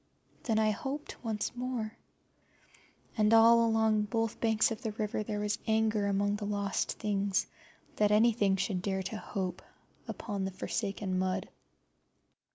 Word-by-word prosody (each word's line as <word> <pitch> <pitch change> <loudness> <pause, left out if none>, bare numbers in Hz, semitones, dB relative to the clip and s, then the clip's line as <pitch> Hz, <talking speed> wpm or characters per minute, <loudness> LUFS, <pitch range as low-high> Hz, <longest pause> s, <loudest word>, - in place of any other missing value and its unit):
Then 225 -3 0
I 215 -1 +3
hoped 275 +8 -5
once 220 0 -2
more, 245 -3 -3 1.2
and 215 -1 +3
all 230 +1 +7
along 220 -2 +2
both 225 0 -2
banks 225 0 +3
of 225 - -4
the 220 -4 -3
river 215 0 -2
there 210 0 -3
was 210 0 -1
anger 220 -2 +2
among 205 +1 +1
the 205 - -5
lost 200 -1 -1
things 200 -2 0 0.5
that 210 -1 +4
anything 210 -2 +4
should 190 -1 -1
dare 190 0 -1
to 215 - -4
hope 190 -4 -4 0.5
upon 200 -3 -4
the 190 - -1
forsaken 195 0 -3
mud. 185 0 -1
210 Hz, 145 wpm, -31 LUFS, 200-225 Hz, 1.2 s, all